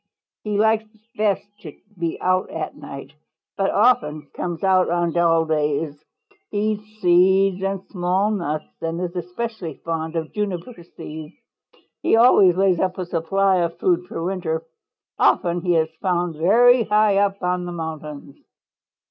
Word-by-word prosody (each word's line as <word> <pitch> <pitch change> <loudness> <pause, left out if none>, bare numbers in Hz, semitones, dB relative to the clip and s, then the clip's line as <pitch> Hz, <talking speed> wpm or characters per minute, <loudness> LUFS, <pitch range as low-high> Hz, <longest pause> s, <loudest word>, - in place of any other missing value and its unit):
He 210 -1 -2
likes 220 0 +2 0.3
best 205 -2 0
to 155 -7 -11 0.2
be 170 -2 -3
out 185 0 +1
at 160 - -5
night, 135 0 -9 0.4
but 195 0 0
often 155 - +1
comes 175 -1 -4
out 185 -1 +3
on 175 0 0
dull 165 -1 +3
days. 150 -1 -1 0.5
He - - -4
eats 215 0 -8
seeds 190 +2 +4
and 195 0 -2
small 185 +2 0
nuts 160 -7 -2 0.2
and 165 +1 -3
is 180 0 -4
especially 180 -1 -5
fond 165 0 -3
of 160 -1 -3
juniper 205 0 -4 0.2
seeds. 155 +1 -8 0.7
He - - +3
always 215 -6 +6
lays 190 -3 +3
up 185 -1 -1
a 185 - -3
supply 185 +3 +1
of 170 -1 -1
food 180 -1 +1
for 165 - -5
winter. 170 -3 -2 0.6
Often 175 0 +2
he 175 -1 +1
is 160 -1 +2
found 175 -2 0
very 230 +9 +5
high 210 -1 +3
up 200 -1 +1
on 180 0 0
the 175 - -5
mountains. 155 -4 -7
180 Hz, 150 wpm, -22 LUFS, 165-195 Hz, 0.7 s, always